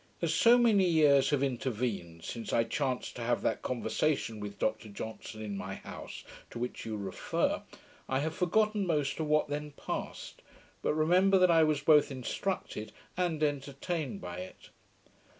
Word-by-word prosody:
As 165 -2 0
so 230 +8 +6
many 220 -6 +5
years 150 -5 +5
have 145 -2 +2
intervened, 115 -10 -2
since 115 -1 -5
I 115 - +3
chanced 130 +1 -2
to - - -5
have 120 +1 0
that - - 0
conversation 120 -1 -1
with 105 -1 -6
Dr 110 0 -1
Johnson 110 +1 -7
in 105 -2 -4
my 95 0 -5
house, - - -9 0.3
to - - -8
which 125 -1 -4
you 110 -1 -3
refer, 95 -3 -1 0.5
I 130 - +1
have 155 +3 -1
forgotten 210 +3 +1
most 150 -4 0
of 155 - -1
what 150 0 +3
then 145 0 -4
passed, - - -6 0.4
but - - 0
remember 180 +5 +4
that 185 -1 +5
I 165 -1 +6
was 155 -2 +2
both 150 0 +5
instructed 130 - -3 0.2
and 175 -4 0
entertained 145 - -2
by 90 -1 -6
it. 90 +1 -9
140 Hz, 165 wpm, -31 LUFS, 110-160 Hz, 0.5 s, so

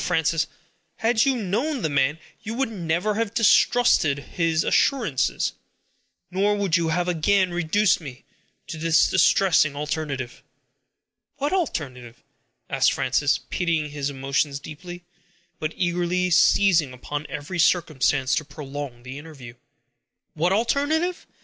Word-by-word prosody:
Frances! 160 0 +1 0.5
had 225 +1 +2
you 270 -1 +2
known 235 - -2
the - - +2
man, 140 +1 +1 0.2
you 225 +1 -5
would 265 -2 -1
never 180 +1 -1
have 225 0 -2
distrusted 230 - +4
his 165 +3 -1
assurance; 225 - +1 0.8
nor 200 +3 +1
would 200 -4 0
you 170 -2 +1
have 175 +2 0
again 180 +2 +2
reduced 175 +3 +1
me 135 -4 -10 0.4
to 160 - -7
this 165 0 +3
distressing 185 -5 +3
alternative." 145 -4 -4 0.9
"What 290 +4 -2
alternative?" 130 - -4 0.4
asked - - +2
Frances, 145 +2 +1
pitying 165 -5 -1
his 145 -1 -3
emotions 140 +1 -1
deeply, 175 +5 -10 0.6
but 155 -1 -2
eagerly 180 0 0
seizing 170 -5 +4
upon 145 +4 -6
every 150 +5 -5
circumstance 155 -5 +2
to - - +1
prolong 140 -4 -8
the 130 +3 -8
interview. 145 -6 -11 0.8
"What 170 +4 0
alternative! 290 - 0
165 Hz, 125 wpm, -24 LUFS, 145-200 Hz, 0.9 s, distrusted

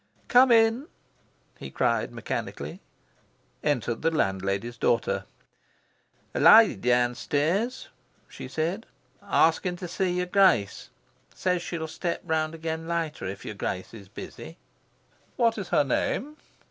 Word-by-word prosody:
"Come 250 +1 +6
in!" 225 +5 +4 0.7
he - - -7
cried - - 0
mechanically. - - -5 0.8
Entered 120 -5 -1
the 165 - +2
landlady's 100 - -1
daughter. 115 -1 0 1.1
"A - - -2
lady - - +8
downstairs," 145 - 0 0.4
she - - -9
said, 170 +8 -3 0.3
"asking 180 -2 +2
to 180 0 -7
see 180 +1 -1
your 180 0 -1
Grace. 180 - +2 0.5
Says 180 -2 0
she'll 165 -2 -4
step 170 +2 -3
round 160 -1 -1
again 160 0 -4
later 165 -2 -3
if 100 +1 -7
your - - -5
Grace 95 -1 -4
is 100 -4 -12
busy." 160 - -10 0.8
"What 230 -3 +2
is 195 - -6
her - - +3
name?" 275 - -1
160 Hz, 120 wpm, -26 LUFS, 120-185 Hz, 1.1 s, lady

